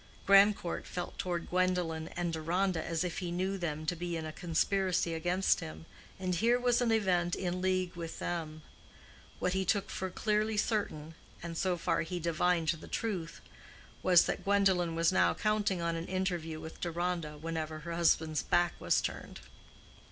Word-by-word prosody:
Grandcourt 195 Hz, -2 st, +4 dB
felt 180 Hz, -1 st, -5 dB
toward 175 Hz, -2 st, -2 dB
Gwendolen 180 Hz, -3 st, 0 dB
and 175 Hz, -1 st, -1 dB
Deronda 170 Hz, +2 st, 0 dB
as 165 Hz, +1 st, -1 dB
if 175 Hz, -2 st, -3 dB
he 175 Hz, -2 st, -4 dB
knew 185 Hz, +3 st, -1 dB
them 155 Hz, -4 st, -3 dB
to 175 Hz, -, 0 dB
be 170 Hz, 0 st, -3 dB
in 160 Hz, -, -4 dB
a 155 Hz, -, -4 dB
conspiracy 180 Hz, 0 st, +1 dB
against 175 Hz, +4 st, +1 dB
him, 80 Hz, +1 st, -8 dB, 0.3 s
and 185 Hz, -1 st, -1 dB
here 235 Hz, +7 st, +3 dB
was 245 Hz, 0 st, +2 dB
an 240 Hz, -2 st, +2 dB
event 180 Hz, -5 st, +2 dB
in 180 Hz, -1 st, -2 dB
league 185 Hz, -1 st, 0 dB
with 165 Hz, -1 st, -6 dB
them. 155 Hz, -3 st, -4 dB, 0.7 s
What 180 Hz, -, 0 dB
he 190 Hz, 0 st, +1 dB
took 195 Hz, +2 st, 0 dB
for 190 Hz, -, -3 dB
clearly 215 Hz, +3 st, 0 dB
certain—and 165 Hz, -5 st, -3 dB
so 180 Hz, +1 st, 0 dB
far 170 Hz, -, 0 dB
he 175 Hz, +2 st, -3 dB
divined 170 Hz, 0 st, +1 dB
the 165 Hz, -1 st, -2 dB
truth—was 180 Hz, -2 st, -1 dB
that -, -, -2 dB
Gwendolen 190 Hz, -4 st, +2 dB
was 165 Hz, +1 st, +3 dB
now 185 Hz, -, +3 dB
counting 205 Hz, -4 st, 0 dB
on 170 Hz, 0 st, 0 dB
an 165 Hz, +1 st, -4 dB
interview 175 Hz, -4 st, -2 dB
with 160 Hz, -, -9 dB
Deronda 170 Hz, -2 st, -2 dB
whenever 155 Hz, 0 st, -4 dB
her 170 Hz, +1 st, -5 dB
husband's 160 Hz, -2 st, +2 dB
back 175 Hz, 0 st, +2 dB
was -, -, +2 dB
turned. -, -, -5 dB
175 Hz, 165 wpm, -32 LUFS, 165-190 Hz, 0.7 s, Grandcourt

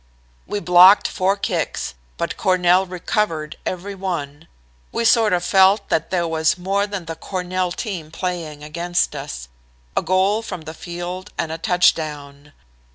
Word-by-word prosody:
"We 205 Hz, -, -2 dB
blocked 180 Hz, +2 st, +7 dB
four 195 Hz, +1 st, 0 dB
kicks, 200 Hz, -, -2 dB, 0.2 s
but -, -, -2 dB
Cornell 185 Hz, 0 st, +3 dB
recovered 175 Hz, -3 st, -2 dB
every 185 Hz, +3 st, -4 dB
one. 165 Hz, -6 st, -5 dB, 0.4 s
We 230 Hz, -, -1 dB
sort 225 Hz, -2 st, +5 dB
of 180 Hz, -1 st, +1 dB
felt 195 Hz, +2 st, +4 dB
that 160 Hz, -, 0 dB
there 175 Hz, -2 st, 0 dB
was 160 Hz, 0 st, +1 dB
more 195 Hz, +3 st, 0 dB
than 200 Hz, -4 st, -5 dB
the 165 Hz, -, -4 dB
Cornell 185 Hz, +1 st, -3 dB
team 180 Hz, -5 st, -5 dB
playing 165 Hz, -3 st, -4 dB
against 170 Hz, +3 st, -1 dB
us -, -, -6 dB, 0.5 s
a -, -, +2 dB
goal 190 Hz, +4 st, +2 dB
from 195 Hz, -7 st, -6 dB
the 160 Hz, 0 st, -8 dB
field 175 Hz, +3 st, -6 dB
and 160 Hz, -, -2 dB
a 165 Hz, -, -5 dB
touchdown. 150 Hz, -5 st, 0 dB
180 Hz, 150 wpm, -21 LUFS, 160-190 Hz, 0.5 s, blocked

